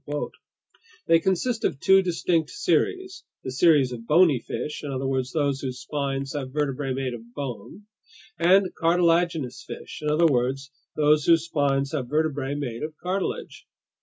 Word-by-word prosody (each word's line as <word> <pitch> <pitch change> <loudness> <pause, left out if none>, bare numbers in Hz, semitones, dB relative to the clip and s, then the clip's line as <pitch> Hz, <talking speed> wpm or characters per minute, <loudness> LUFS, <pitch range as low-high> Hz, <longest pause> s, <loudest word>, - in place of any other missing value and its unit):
They 165 - +5
consist 190 +7 -1
of 135 - 0
two 190 +4 +5
distinct 170 -2 0
series: 380 -2 -1 0.2
the 130 - -4
series 140 -2 +4
of 115 -1 -8
bony 155 -4 +5
fish, 150 +5 -5
in 145 - -4
other 135 0 -3
words, 130 -1 -1
those 140 -2 0
whose 130 -2 -4
spines 135 0 -3
have 135 -3 -4
vertebrae 140 -2 -2
made 130 -1 -2
of 120 0 -10
bone; 140 - -6 0.6
and 185 +3 +4
cartilaginous 170 -4 +1
fish, - - -9
in 150 - -1
other 155 +3 +3
words, 135 0 0 0.2
those 150 -1 +3
whose 165 -1 +4
spines 140 -4 0
have 130 -6 -3
vertebrae 145 -2 -1
made 125 -6 -4
of 155 0 -5
cartilage. 185 +2 -4
145 Hz, 155 wpm, -25 LUFS, 135-170 Hz, 0.6 s, They